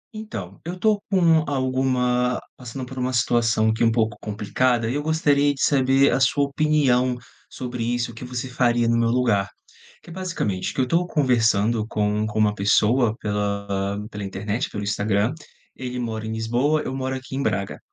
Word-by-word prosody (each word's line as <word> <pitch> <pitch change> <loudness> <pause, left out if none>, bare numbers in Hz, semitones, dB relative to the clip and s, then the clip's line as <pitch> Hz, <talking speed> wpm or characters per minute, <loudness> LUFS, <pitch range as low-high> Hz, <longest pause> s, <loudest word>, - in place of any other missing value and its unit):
Então, 100 - -7
eu 175 +2 -5
tô 210 +2 +2
com 170 -5 +4
alguma 130 -2 +1 0.2
passando 125 +1 -7
por 130 +1 -8
uma 125 +1 -1
situação 115 -2 +2
aqui 110 - -1
um 115 - +4
pouco 110 -2 0
complicada, 115 +3 0
e 120 - -1
eu 145 - -1
gostaria 145 -2 +2
de - - -2
saber 135 0 +4
a - - +1
sua 135 +2 +3
opinião 140 -4 +2 0.3
sobre 125 -2 -5
isso, 120 0 -1
o - - -14
que 115 - -9
você 125 0 -4
faria 120 -2 +1
no 115 - +2
meu 115 0 +2
lugar. 115 -5 +1 0.5
Que 170 - -12
é - - -8
basicamente, 170 - -2
que - - -6
eu - - +4
estou 165 +8 +1
conversando 115 - +2
com 105 0 0
com 105 - -5
uma 105 -1 +3
pessoa, 110 +3 +2
pela 100 -1 -2
pela 105 -1 -6
internet, 105 +6 -3
pelo 105 - -5
Instagram. 105 +3 0 0.4
Ele 125 -1 -5
mora 110 -2 -4
em - - -4
Lisboa, 120 +7 0
eu 130 - -4
moro 130 0 -2
aqui 130 0 -7
em 135 - -1
Braga. 100 -7 -2
125 Hz, 185 wpm, -23 LUFS, 110-135 Hz, 0.5 s, com